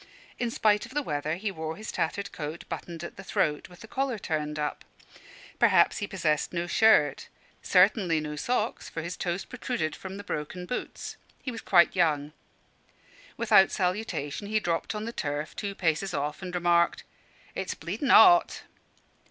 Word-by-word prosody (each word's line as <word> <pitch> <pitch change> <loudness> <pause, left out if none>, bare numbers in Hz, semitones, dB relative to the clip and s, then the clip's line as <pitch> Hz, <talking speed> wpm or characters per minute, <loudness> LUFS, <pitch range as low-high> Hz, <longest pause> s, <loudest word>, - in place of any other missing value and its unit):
In 240 - 0
spite 215 -1 +2
of 260 - -15
the 295 - +1
weather, 150 - -2
he 200 +3 -3
wore 160 -3 -5
his 215 +4 -7
tattered 200 +5 -2
coat 155 +2 -6
buttoned 170 -1 -6
at 170 - -8
the 195 - -8
throat, 150 -5 -1
with 180 - -15
the 225 - -10
collar 265 -1 -1
turned 150 -5 -3
up. 150 -1 -3 0.8
Probably - - +5
he 205 - -3
possessed 160 -7 0
no 170 0 -2
shirt; 170 -6 +4 0.3
certainly 180 -3 +4
no 150 0 -5
socks, 230 +7 -2
for 165 - -5
his 175 +2 -4
toes 175 +1 -3
protruded 245 - -3
from 190 0 -8
the 205 - -7
broken 180 +1 -5
boots. 250 - -5 0.3
He 255 - -3
was 230 - -7
quite 175 -1 +4
young. 150 -4 +1 1.0
Without 215 -4 +5
salutation 185 -3 -2
he 215 +1 +1
dropped 170 +2 -2
on 210 +1 -4
the 230 - -5
turf 145 -3 -3
two 200 -2 -4
paces 175 +2 0
off 145 +4 -3
and 180 -1 -5
remarked 170 -1 +2 0.5
"It's 190 - -3
bleedin' 205 - -4
'ot." 350 -2 +6
180 Hz, 170 wpm, -28 LUFS, 155-210 Hz, 1.0 s, ot